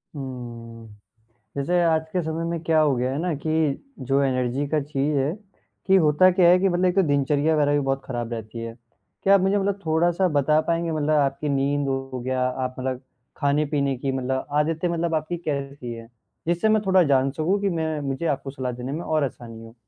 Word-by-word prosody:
हम्म। 120 -4 -8 0.7
जैसे 175 +6 +1
आज 160 -1 +3
के 180 - 0
समय 160 +1 -3
में 170 0 -2
क्या 160 -1 +3
हो 145 -4 +3
गया 125 +2 -1
है 140 - -3
ना 175 -2 -1
कि 155 - 0 0.6
जो 140 +1 +3
एनर्जी 130 +1 0
का 155 +1 +1
चीज़ 145 +1 -1
है, 135 +3 +1 0.6
कि 190 - +5
होता 160 +2 +5
क्या 175 -2 +5
है 180 +1 +6
कि 195 0 +2
मतलब 180 +1 +1
एक 180 0 +2
तो 195 - +5
दिनचर्या 145 +2 +2
वगैरह 145 -1 +2
भी 145 - +3
बहुत 135 0 0
खराब 120 -2 -4
रहती 115 +1 -7
है। 115 0 -6 0.5
क्या 195 - +5
आप 190 - +3
मुझे 195 +2 +2
मतलब 200 0 -1
थोड़ा-सा 175 +3 +2
बता 150 +2 +3
पाएँगे 170 0 0
मतलब 155 -1 -1
आपकी 140 +1 0
नींद 140 +1 0
हो 135 -1 -3
गया, 130 +1 -1
आप 130 0 -3
मतलब 130 0 -3 0.4
खाने-पीने 140 -1 +1
की 135 +1 -2
मतलब 130 0 -2
आदतें 160 +3 0
मतलब 170 -1 -1
आपकी 155 +3 -2
कैसी 140 -6 -4
है? 115 0 -10 0.4
जिससे 175 +5 +2
मैं 215 -1 +3
थोड़ा 190 -1 +5
जान 135 -3 +2
सकूँ 170 +7 0
कि 200 - +1
मैं 160 -3 -2
मुझे 135 +4 -3
आपको 140 -2 -2
सलाह 130 -2 -4
देने 125 +2 -6
में 160 +4 -3
और 155 -3 0
आसानी 115 -4 -6
हो। 115 +1 -13
145 Hz, 210 wpm, -24 LUFS, 130-165 Hz, 0.7 s, है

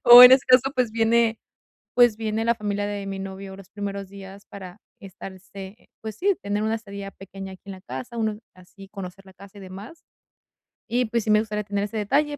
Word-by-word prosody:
O, 240 +1 +12
en 250 - +11
ese 260 0 +6
caso, 255 +1 +5
pues 245 -4 +1
viene 230 0 +3 0.6
pues 240 -3 +5
viene 220 0 -2
la 235 0 +3
familia 205 -1 -2
de 205 -1 -4
mi 195 0 -4
novio 195 0 -7
los 195 -1 -14
primeros 200 -1 -5
días, 195 0 -11
para 190 0 -10 0.2
estarse, 195 +1 -11
pues 220 -1 -6
sí, 390 - +2
tener 205 +1 -1
una 220 +1 +1
estadía 200 -3 -7
pequeña 195 0 -9
aquí 185 - -15
en 195 - -7
la 185 - -12
casa, 240 +3 -7
uno, 215 -1 -1
así 190 +2 -15
conocer 195 -1 -9
la 190 - -15
casa 200 +1 -15
y 200 - -10
demás. 200 - -10 0.8
Y 245 +2 +1
pues, 230 0 -1
sí 215 - +1
me 215 - +6
gustaría 210 -1 -2
tener 200 0 -2
ese 220 +2 -6
detalle, 290 +8 +1
205 Hz, 210 wpm, -24 LUFS, 195-225 Hz, 0.8 s, O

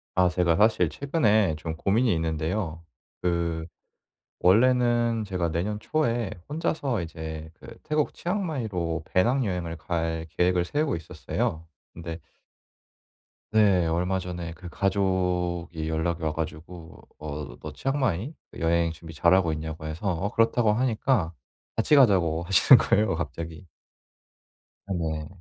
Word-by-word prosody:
아 90 -1 +5
제가 90 -2 +2
사실 105 -5 +4
최근에 110 - +2
좀 80 0 -5
고민이 110 +6 +2
있는데요 80 +2 -2 0.4
그 85 -2 -1 0.7
원래는 120 +2 +3
제가 90 -4 -1
내년 95 +6 -2
초에 120 -5 0 0.2
혼자서 145 - -1
이제 80 -1 -6
그 - - -12
태국 150 0 0
치앙마이로 110 - -2
배낭여행을 95 -6 +1
갈 80 0 -2
계획을 90 0 +3
세우고 145 - 0
있었어요. 80 +3 -3 0.3
근데 85 0 -7 1.3
네. 100 -5 +4
얼마 90 +3 0
전에 90 -2 -5
그 90 +1 -10
가족이 90 -4 -1
연락이 80 +1 -1
와 80 - +1
가지고 80 +2 -7 0.2
어 75 -1 -6
"너 - - -8
치앙마이 135 - -1 0.3
여행 85 0 +2
준비 80 0 -11
잘하고 85 +2 +3
있냐."고 80 0 -5
해서 80 +6 -4
어 95 +2 -1
"그렇다."고 115 -1 +3
하니까 115 -5 +1 0.4
"같이 115 +7 +3
가자."고 90 - +4
하시는 90 +1 +7
거예요 105 -3 +2
갑자기. 80 +2 -6 1.2
아 100 - -2
네. 80 -3 -2
90 Hz, 270 characters per minute, -26 LUFS, 80-110 Hz, 1.3 s, 하시는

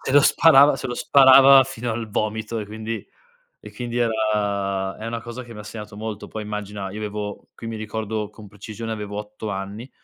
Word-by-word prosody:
se 130 - -3
lo 145 - +8
sparava 145 -2 +6
se - - -5
lo 125 - -4
sparava 135 +1 +7
fino 125 -2 -5
al 115 0 -4
vomito 110 +2 -2
e 105 - -6
quindi 110 +1 -5 0.6
e - - -10
quindi 120 -1 -5
era 100 -4 0
è 110 - -6
una 115 0 -3
cosa 120 +2 -7
che 120 - -11
mi 105 - -9
ha - - -7
segnato 105 -1 -9
molto, 110 -1 -6
poi 110 - -6
immagina, 105 -2 -5
io 105 - -7
avevo 105 -1 -5
qui 115 - -8
mi 115 - -5
ricordo 110 0 -4
con 105 -1 -13
precisione 110 +3 -8
avevo 105 -1 -5
8 105 +1 -7
anni, 100 +6 -6
110 Hz, 205 wpm, -23 LUFS, 105-115 Hz, 0.6 s, lo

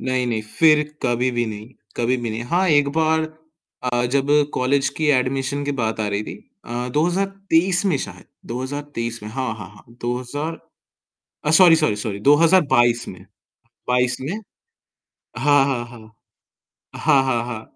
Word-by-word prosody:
नहीं, 130 -1 -1
नहीं 110 -3 -2
फिर 150 +7 +4 0.2
कभी 120 +1 +1
भी 120 -1 -1
नहीं 105 0 -7 0.3
कभी 120 +2 +1
भी 120 -2 -4
नहीं 110 +2 -4
हाँ 175 +8 +1
एक 145 -3 +4
बार 160 0 +2 0.6
अ, 120 -1 0
जब 135 +2 0 0.3
कॉलेज 135 +2 +1
की 155 - 0
एडमिशन 135 +2 -2
की 145 - -1
बात 110 -1 -1
आ 105 - 0
रही 100 +1 -2
थी - - -7 0.3
अ, 120 +1 -4
2023 180 +3 +1
में 175 -7 +2
शायद 90 -7 -7 0.2
2023 125 -2 -5
में 105 - -6
हाँ, 130 +3 -3
हाँ, 95 -5 -9
हाँ, 105 - -18 0.2
2000 130 +7 -4 0.9
अ - - +3
सॉरी 165 0 +7
सॉरी 155 -10 +1
सॉरी 105 -1 -4
2022 140 - +4
में 90 - -9 0.7
22 125 0 +2
में 135 +6 -4 1.1
हाँ, 145 +1 +4
हाँ, 130 -4 -1
हाँ। 115 -2 -15 0.8
हाँ, 140 -3 +3
हाँ, 120 -3 0
हाँ, 115 -3 -5
130 Hz, 155 wpm, -21 LUFS, 120-150 Hz, 1.1 s, सॉरी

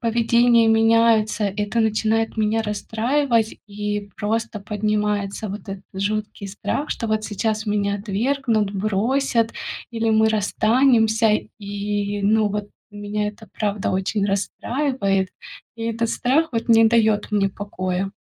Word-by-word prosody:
поведение 235 0 +3
меняется, 225 -1 +3
это 205 +3 -1
начинает 220 +1 +1
меня 220 +1 +1
расстраивать 225 +3 0
и 205 0 -4
просто 220 +1 -2
поднимается 210 0 -1
вот 205 +2 -6
этот 195 -1 -7
жуткий 205 +1 -3
страх, 235 +9 -3
что 230 - -3
вот 215 0 0
сейчас 215 +1 -2
меня 200 -1 0
отвергнут, 220 +1 0
бросят 225 +4 0 0.4
или 225 -1 0
мы 220 0 +4
расстанемся. 220 +1 +3 0.3
И 205 0 -3
ну, 215 +1 +3
вот 205 0 -4 0.2
меня 205 0 -3
это, 210 +1 -11
правда, 205 -2 -2
очень 190 +2 0
расстраивает. 200 0 -1 0.5
И 230 - -7
этот 230 0 -1
страх 275 +8 +1
вот 230 0 -2
не 225 0 +7
даёт 220 -2 +3
мне 200 -2 +1
покоя. 190 -1 -3
215 Hz, 125 wpm, -22 LUFS, 205-230 Hz, 0.5 s, не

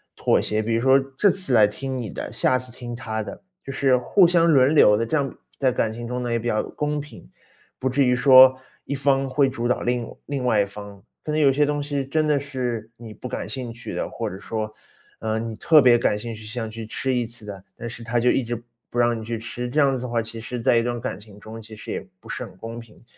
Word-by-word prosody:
妥 - - +2
协， 105 +1 0
比 115 +1 -1
如 115 - +1
说 135 +1 +6 0.2
这 205 - +5
次 185 -8 +1
来 110 -3 +7
听 130 +5 -5
你 115 -4 -4
的， - - -6
下 120 +3 +2
次 125 0 -7
听 120 0 -7
他 110 -2 -4
的， 110 - -8 0.2
就 135 - -6
是 130 -2 +3
互 180 +10 +4
相 170 -1 +4
轮 140 0 +5
流 105 -8 +6
的， 115 - 0
这 155 - 0
样 140 -2 -1 0.2
在 130 -2 +2
感 115 -2 0
情 120 +1 -6
中 125 +1 -3
呢， 120 - -2
也 115 - +1
比 120 - -4
较 110 -2 +1
公 150 0 -3
平。 110 - -11 0.5
不 130 - 0
至 135 +1 +2
于 125 - +3
说 130 0 +8 0.3
一 140 - -3
方 135 -1 +2
会 135 +1 +2
主 120 -2 -3
导 125 - 0
另 120 -1 -1 0.2
另 140 -3 -3
外 110 -4 +3
一 - - +1
方， 100 0 -10 0.2
可 150 - -3
能 155 0 +1
有 140 - +6
些 145 +2 +3
东 145 0 -1
西 140 -2 -2
真 155 +2 0
的 150 -2 +3
是 125 -5 -4
你 115 -2 -10
不 125 - -8
感 - - -5
兴 125 -3 -5
趣 120 - -8
的， - - -2
或 115 -2 -4
者 95 - -8
说， 110 0 -4 0.5
呃， 110 0 -2
你 115 -1 -4
特 155 +5 +5
别 120 -2 +6
感 105 - +1
兴 115 0 -6
趣， 110 - -11
想 115 0 -4
去 110 0 -7
吃 130 +4 -2
一 125 -2 0
次 115 -1 -7
的， 100 -2 -8
但 120 - -6
是 120 0 -9
他 120 +1 0
就 125 +1 +3
一 130 - +2
直 120 0 -5 0.3
不 120 - -2
让 120 -1 +2
你 110 - -8
去 115 0 -3
吃， 120 +2 -5
这 145 +5 -1
样 135 -2 +4
子 125 - -6
的 - - -3
话， 115 -1 0
其 110 +1 -7
实 120 +1 -5
在 120 -1 +4
一 115 - +2
段 120 0 -3
感 95 - -4
情 105 -1 -15
中， 110 +2 -9
其 110 0 -11
实 110 - -11
也 - - -4
不 - - -16
是 - - -4
很 - - -14
公 115 +3 -7
平。 115 -1 -15
120 Hz, 290 characters per minute, -23 LUFS, 115-135 Hz, 0.5 s, 说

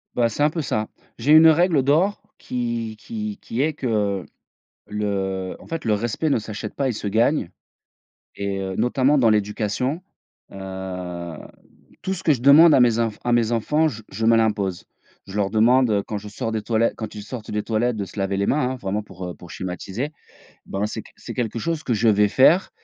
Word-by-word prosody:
Bah, 120 -1 +3
c'est 115 - -5
un 150 - +5
peu 160 +1 -3
ça. 110 -5 -1 0.3
J'ai 135 +6 +1
une 160 +1 +9
règle 160 -3 +3
d'or 165 +9 +2 0.2
qui 120 -3 -3
qui 215 -2 -5
qui 120 +4 -2
est 155 +1 +1
que 105 - -1 0.6
le 95 -3 -2
en - - -15
fait 165 -1 -5
le 110 - +1
respect 120 +8 -1
ne 140 - +3
s'achète 110 -1 -6
pas 140 - -1
et - - 0
se 105 -2 -4
gagne 115 - +1 0.8
et 100 -1 -3
heu, 95 -1 -4
notamment 130 +5 +2
dans 120 -5 +4
l'éducation, 105 - -1 0.5
heu, 90 -3 -6 0.7
tout 190 - -2
ce 190 0 -5
que 155 - +4
je 120 - -7
demande 150 +4 +8
à - - +5
mes 120 -2 +4
enf 115 -2 -1
à 120 - +1
mes 120 -1 +2
enfants 150 +8 +2
je 110 -6 -7
je 110 +4 -2
me 115 0 +6
l'impose. 105 -5 0 0.4
Je 100 - -10
leur 100 -2 +1
demande, 120 +3 +4
heu, 100 -1 +2
quand 105 - -5
je 105 +1 -9
sors 115 +2 -4
des 110 - -1
toilet 115 0 +1
quand 110 -2 -6
ils 105 - -7
sortent 110 +1 -8
des 105 0 -1
toilettes 115 +1 0
de 100 - -2
se 100 - -11
laver 95 0 0
les 100 - 0
mains, 130 -3 +1
hein, - - -5
vraiment 105 -2 -3
pour, 95 -3 -10
heu, 90 - -6
pour 90 - -14
schématiser. 95 - -4 0.5
Ben, 100 +2 -2
c'est - - -5
qu - - -18
c'est - - -8
quelque 115 -1 -2
chose 160 +5 -2
que 125 - -1
je 115 +1 +2
vais 105 0 +4
faire 150 - +4
110 Hz, 215 wpm, -22 LUFS, 100-130 Hz, 0.8 s, une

